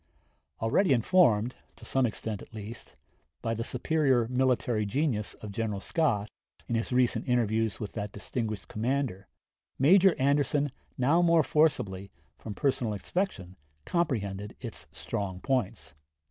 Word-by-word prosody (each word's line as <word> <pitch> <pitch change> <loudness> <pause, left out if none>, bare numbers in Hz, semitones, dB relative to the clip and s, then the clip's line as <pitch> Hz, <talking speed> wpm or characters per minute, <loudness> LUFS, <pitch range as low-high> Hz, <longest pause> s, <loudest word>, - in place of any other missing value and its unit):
Already 135 - +3
informed, 120 - +3 0.2
to - - -14
some 130 -2 +2
extent 110 -1 -4
at - - -13
least, 110 +2 -8 0.5
by 115 -1 0
the 115 0 -2
superior 130 -2 +1
military 125 -3 +1
genius 110 0 -1
of 105 - -8
General 105 -1 -2
Scott, 110 - 0 0.4
in - - -3
his 115 +1 -1
recent 125 +1 +1
interviews 110 -3 +1
with 105 - -5
that 105 -2 -4
distinguished 110 0 -4
commander, 115 -4 -2 0.5
Major 185 +6 +6
Anderson 145 +1 +2 0.3
now 145 +7 +3
more 170 -2 +5
forcibly, 100 -11 +1 0.3
from 105 -2 -7
personal 130 -6 0
inspection, 100 - -3 0.3
comprehended 105 - -1
its - - -8
strong 95 -3 -4
points. 115 - -2
120 Hz, 130 wpm, -29 LUFS, 105-140 Hz, 0.5 s, Major